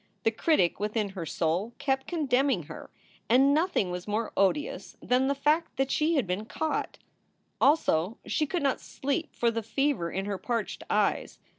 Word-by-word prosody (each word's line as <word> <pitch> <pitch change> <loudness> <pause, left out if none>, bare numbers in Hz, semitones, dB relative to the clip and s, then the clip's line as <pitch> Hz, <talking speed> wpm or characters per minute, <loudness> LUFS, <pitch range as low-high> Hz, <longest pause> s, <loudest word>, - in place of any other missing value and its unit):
The 225 - +3
critic 220 - +2
within 210 0 -1
her 185 -4 -6
soul 175 +10 -1
kept 270 -2 -1
condemning 270 - +1
her, 155 +1 -10 0.4
and 270 +4 +5
nothing 305 - +1
was 180 +1 -5
more 215 +2 -1
odious 200 +10 0
than 255 +2 +2
the 280 - +1
fact 300 +3 +1
that 270 0 0
she 315 +2 +2
had 270 -7 +2
been 185 +4 -3
caught. 315 +7 -2 0.6
Also, 225 - +3
she 305 - 0
could 345 0 -2
not 275 -2 +1
sleep 285 +4 -3
for 235 -1 +2
the 230 0 -2
fever 270 -5 0
in 190 +3 -3
her 200 -2 -3
parched 235 -3 -3
eyes. - - 0
250 Hz, 170 wpm, -28 LUFS, 200-285 Hz, 0.6 s, and